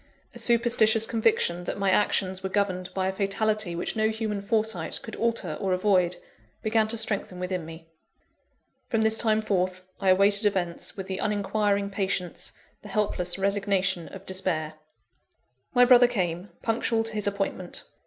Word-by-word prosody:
A - - -9
superstitious 230 -2 +3
conviction 215 -6 +1
that - - -3
my 195 -1 +1
actions 190 -1 +1
were 190 - -3
governed 185 -2 -1
by 190 -1 0
a - - +1
fatality 200 -1 0
which 175 - -2
no 220 0 +2
human 220 -2 -3
foresight 220 +2 -1
could 225 - -7
alter 230 -8 -1
or 190 -2 +1
avoid, 185 -2 +2 0.5
began 220 0 +2
to 230 +1 -2
strengthen 205 -4 -2
within 180 -2 -3
me. 165 0 -11 1.0
From 225 -4 0
this 220 0 +3
time 220 -1 +2
forth, 185 -3 -1 0.2
I 195 -1 +1
awaited 200 +3 +4
events 180 -3 -2
with 195 - -5
the 190 0 -4
uninquiring 205 -1 0
patience, 190 -3 -2 0.3
the - - -11
helpless 195 -5 0
resignation 195 -3 0
of 195 0 -11
despair. 180 -5 -2 1.0
My 245 0 +7
brother 245 -1 +7
came, 185 -5 -2
punctual 225 0 +1
to 225 0 -6
his 210 -1 -1
appointment. 195 -3 -3
200 Hz, 155 wpm, -26 LUFS, 185-220 Hz, 1.0 s, My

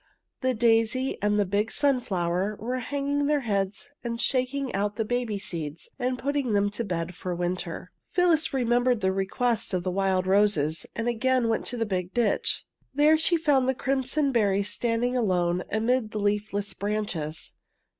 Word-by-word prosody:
The 255 -1 0
daisy 230 +3 +2
and 210 0 +2
the 205 - +3
big 205 +3 0
sun 275 -3 +2
flower 185 +1 -1
were 250 +4 -2
hanging 285 +3 -1
their 295 -1 +2
heads 200 -1 -2
and 235 -1 -3
shaking 260 +1 0
out 205 +1 -1
the 225 - -1
baby 245 -2 -1
seeds 165 -5 -5
and 250 0 0
putting 275 -2 -1
them 205 0 +2
to 225 +3 -3
bed 175 -3 -3
for 180 +1 -4
the 175 - -6
winter. 180 0 -3 0.2
Phyllis 345 -3 +2
remembered 245 -2 +2
the 190 0 +2
request 205 +2 0
of 180 - -1
the 185 - -1
wild 190 -1 +1
roses, 190 -6 +2
and 230 +1 -2
again 245 0 +2
went 225 - 0
to 245 - -3
the 225 - 0
big 185 -3 -3
ditch. 235 -4 +1 0.3
There 300 +2 +6
she 325 +2 +2
found 280 -5 +2
the 265 - +1
crimson 275 +2 0
berries 200 -4 +2
standing 240 +1 0
alone 180 -6 +1
amid 225 +1 +1
the 215 - -4
leafless 205 0 -1
branches. 200 -7 -3
220 Hz, 175 wpm, -27 LUFS, 195-255 Hz, 0.3 s, There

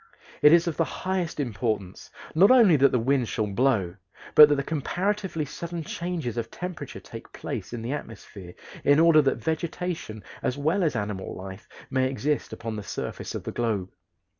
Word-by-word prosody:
It 150 - +8
is 170 0 +6
of 170 -3 -3
the 165 - +3
highest 185 -1 -3
importance 110 -6 -3 0.2
not 185 +6 +6
only 230 -10 +7
that 140 -1 +5
the - - +2
wind 125 0 +1
shall 110 - -1
blow, 100 -4 +1 0.4
but 150 -1 +10
that 140 -1 +1
comparatively 180 +2 -2
sudden 170 +3 -6
changes 165 -8 -4
of 115 -1 -3
temperature 180 +5 -7
take - - -11
place - - -6
in 120 -2 -5
the 120 - -3
atmosphere, 100 -9 -9 0.3
in 145 +1 +5
order 165 -2 +6
that 135 - +1
vegetation 160 - -4 0.2
as 130 - -1
well 160 +7 +1
as 155 -6 +1
animal 105 -3 -4
life 95 +2 -9 0.2
may 130 -1 +2
exist 145 +2 -2
upon 115 -1 -5
the - - -4
surface - - -5
of - - -5
the - - -5
globe. 105 -6 -2
140 Hz, 175 wpm, -26 LUFS, 110-165 Hz, 0.4 s, but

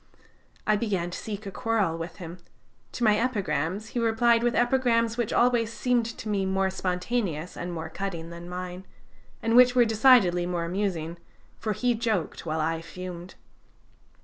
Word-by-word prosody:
I 215 0 +3
began 190 -6 -1
to - - -5
seek 210 -1 -6
a 195 - -5
quarrel 210 -4 0
with 165 0 -6
him; 175 -1 -9 0.5
to 245 - -4
my 210 -2 +4
epigrams 200 - -1
he 245 - -3
replied 230 0 +3
with 240 0 +1
epigrams 240 -2 +2
which 235 -3 -1
always 240 -2 +2
seemed 240 -1 +1
to - - -7
me 205 -2 0
more 190 0 +1
spontaneous 180 -2 -2
and 175 +1 -5
more 165 -1 -5
cutting 170 -1 -5
than 170 +1 -9
mine, 180 +1 -6 0.6
and 230 +1 +2
which 250 0 +7
were 245 -1 +6
decidedly 215 -6 +5
more 175 -1 -2
amusing, 170 -3 -2 0.4
for 215 - -1
he 245 +4 +1
joked 220 -8 -2
while 160 +1 -1
I 165 +1 -1
fumed. 180 +1 -8
195 Hz, 165 wpm, -27 LUFS, 175-230 Hz, 0.6 s, which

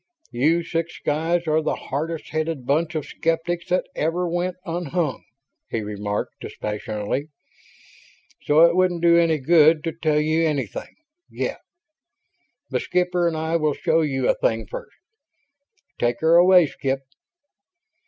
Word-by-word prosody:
"You 160 +8 +2
six 165 0 -3
guys 165 +3 0
are 155 0 +2
the 155 - -1
hardest 160 +4 -4
headed 155 -4 -3
bunch 155 +5 0
of 155 - -2
skeptics 170 +2 -2
that 180 - +1
ever 170 +3 -1
went 175 +1 -1
unhung," 170 -3 -2 0.5
he 115 - -2
remarked, 105 0 -4
dispassionately. 105 +5 -4 1.2
"So 150 +2 +4
it 170 0 +3
wouldn't 180 -2 +1
do 170 0 +6
any 165 -2 +3
good 155 +2 +4
to 165 - -1
tell 155 -2 0
you 155 +2 +1
anything 145 -8 -3 0.3
yet. - - -3 1.1
The - - +1
skipper 180 -1 0
and 165 -2 -1
I 160 +1 0
will 155 -3 0
show 165 - +1
you 135 -4 0
a - - +4
thing 115 -1 -1
first. - - -9 1.0
Take 120 0 0
her 160 +1 +4
away, 180 0 +7
Skip." 135 -2 -3
160 Hz, 140 wpm, -23 LUFS, 145-170 Hz, 1.2 s, away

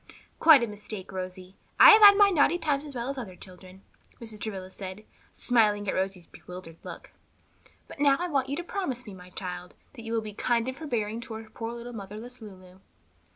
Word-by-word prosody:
"Quite 310 -6 +7
a - - -1
mistake, 210 -2 -7
Rosie; 185 0 -7 0.2
I - - +11
had 415 -2 +9
my 405 -1 +6
naughty 330 0 +3
times 300 -3 -1
as 285 -3 -10
well 240 0 -3
as 275 - -6
other 195 -7 -8
children," 185 +1 -15 0.4
Mrs. 225 -2 -7
Travilla 190 -4 -5
said, 190 +2 -8 0.3
smiling 210 -4 +1
at - - 0
Rosie's 190 -2 -2
bewildered 180 -2 -12
look. - - -10 0.8
"But - - -12
now 280 -1 +4
I 355 - -1
want 275 -5 0
you 280 - -1
to 345 - -4
promise 310 -10 -4
me, 210 - -9
my 180 -1 -13
child, 180 -1 -7 0.2
that 250 - -11
you 225 0 -6
will 225 - +1
be 215 -1 -8
kind 235 +2 0
and 260 - -3
forbearing 235 -7 -3
toward 220 -1 -9
poor 230 0 -5
little 240 +1 -8
motherless 220 +4 -8
Lulu." 185 -3 -13
220 Hz, 200 wpm, -27 LUFS, 190-265 Hz, 0.8 s, I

